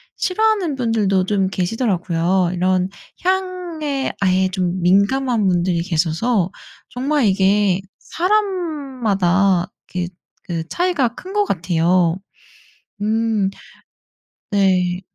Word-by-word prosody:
싫어하는 395 -5 +1
분들도 215 -7 +1
좀 195 -1 +1
계시더라고요. 185 -3 0
이런 185 +1 +1 0.3
향에 355 -7 -1
아예 185 0 +3
좀 185 -1 -1
민감한 210 +5 +2
분들이 175 -1 +1
계셔서 180 +4 0 0.4
정말 275 +2 0
이게 195 -1 +3 0.2
사람마다 265 - 0 0.3
이렇게 180 -1 -2 0.4
그 165 -2 -3
차이가 345 - +1
큰 370 - -10
거 415 0 +2
같아요. 170 - +1 0.9
음. 220 -2 +1 1.0
네. 185 -3 +2
195 Hz, 205 characters per minute, -20 LUFS, 180-270 Hz, 1.0 s, 아예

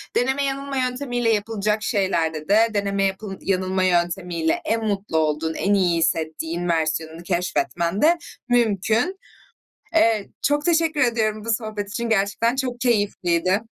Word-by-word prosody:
deneme 265 +3 +1
yanılma 275 0 -3
yöntemiyle 250 -2 -1
yapılacak 210 0 -1
şeylerde 170 -6 0
de 220 +3 +5
deneme 200 -1 0
yap 195 0 0 0.2
yanılma 185 0 0
yöntemiyle 175 -2 0
en 225 0 0
mutlu 200 -5 -1
olduğun, 160 +1 0
en 200 +5 0
iyi 180 -4 +2
hissettiğin 165 +2 -1
versiyonunu 160 0 -1
keşfetmen 175 +1 -1
de 340 +3 +5 0.3
mümkün. 230 - +1 0.8
Eee, 225 -9 +3
çok 290 +2 +1
teşekkür 325 -3 +2
ediyorum 220 -3 +1
bu 230 - 0
sohbet 215 -3 -3
için 235 +3 -3
gerçekten 220 +4 +1
çok 250 -2 -3
keyifliydi. 195 -5 +1
205 Hz, 130 wpm, -22 LUFS, 175-235 Hz, 0.8 s, de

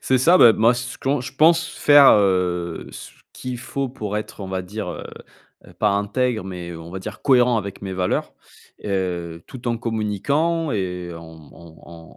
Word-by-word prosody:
C'est 130 - +2
ça, 170 +8 +5
beh, 115 - +8
moi, 115 +2 +4
ce 125 0 -6
qu'en 135 +1 0
je 130 +1 -7
pense 165 +3 +4
faire, 145 -3 +6
heu, 90 -4 +1
ce - - -10 0.2
qu'il 125 -1 -6
faut 135 +2 -4
pour 105 -5 -5
être 105 0 -6
on 95 - -6
va 95 0 -3
dire, 100 +2 -6
heu - - -7 0.6
heu, - - -15
pas 105 - +1
intègre, 110 +2 -1
mais, 90 -2 -7
heu, 85 -1 -8
on 80 +1 -10
va 95 - -5
dire 95 - -9
cohérent 125 -3 +4
avec 100 -1 -7
mes 95 -1 -5
valeurs. 90 -1 -1 0.5
Et - - -8
heu, 90 -4 -3
tout 125 -2 -7
en 120 - 0
communiquant 120 - -1
et 90 -4 -3
en 85 0 -10 0.3
en 85 0 -15
105 Hz, 190 wpm, -21 LUFS, 90-125 Hz, 0.6 s, beh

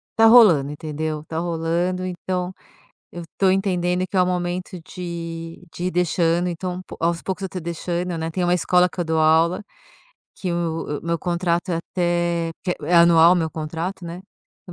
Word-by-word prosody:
tá 225 0 +6
rolando, 190 - +6
entendeu? 155 0 -4
Tá 160 0 -4
rolando, 170 +2 -1
então 180 0 -3 0.6
eu 175 - -7
tô 195 - +3
entendendo 185 -2 +1
que 190 +1 -3
é - - +6
o - - +3
momento 180 0 -3
de 165 -1 -7
de 175 - -4
ir 185 - 0
deixando, 175 0 +1
então 180 +1 -4 0.2
aos 170 0 0
poucos 190 +1 -4
eu 190 - -3
tô 185 - -5
deixando, 170 +1 -3
né. 160 0 -3
Tem 180 +2 -2
uma 175 0 +2
escola 180 +1 +3
que - - -11
eu 175 - 0
dou 160 0 0
aula, 160 +4 +3 0.7
que 185 - -4
o 165 -3 -2
o - - -11
meu 170 0 0
contrato 175 +1 -1
é 170 - 0
até 175 -1 -1
porque 180 - -2
é 175 - +1
anual 170 0 +7
o - - +3
meu 160 -2 -1
contrato, 165 +4 -5
né, 170 0 -6 0.5
então 180 - -11
175 Hz, 190 wpm, -22 LUFS, 165-180 Hz, 0.7 s, anual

